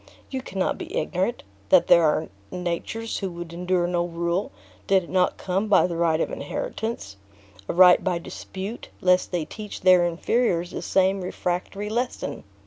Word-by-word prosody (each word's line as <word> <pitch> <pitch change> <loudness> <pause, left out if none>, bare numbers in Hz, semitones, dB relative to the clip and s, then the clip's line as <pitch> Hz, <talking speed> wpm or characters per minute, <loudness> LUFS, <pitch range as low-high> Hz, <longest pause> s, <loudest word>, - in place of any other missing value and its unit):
You 265 -1 -3
cannot 195 -7 -2
be - - -5
ignorant, 190 +6 -1 0.3
that - - +6
there 170 - +6
are 155 0 +2 0.2
natures 180 +6 -3
who 195 - -2
would 170 -1 -7
endure 180 0 0
no 175 0 0
rule, 170 +2 -2 0.4
did 190 -1 +4
it - - -12
not 185 -1 +2
come 195 +3 -1
by 205 - +5
the 175 -1 -3
right 165 -1 +2
of - - -1
inheritance; 225 - -4 0.5
a - - 0
right 180 +1 +7
by 185 -2 0
dispute, 190 +5 -7
lest 180 0 +3
they 175 -4 -1
teach 210 +4 -8
their 185 -1 +6
inferiors 175 0 0
the - - -5
same 190 0 +2
refractory 180 +3 -3
lesson. 240 +4 -3
180 Hz, 165 wpm, -25 LUFS, 170-195 Hz, 0.5 s, right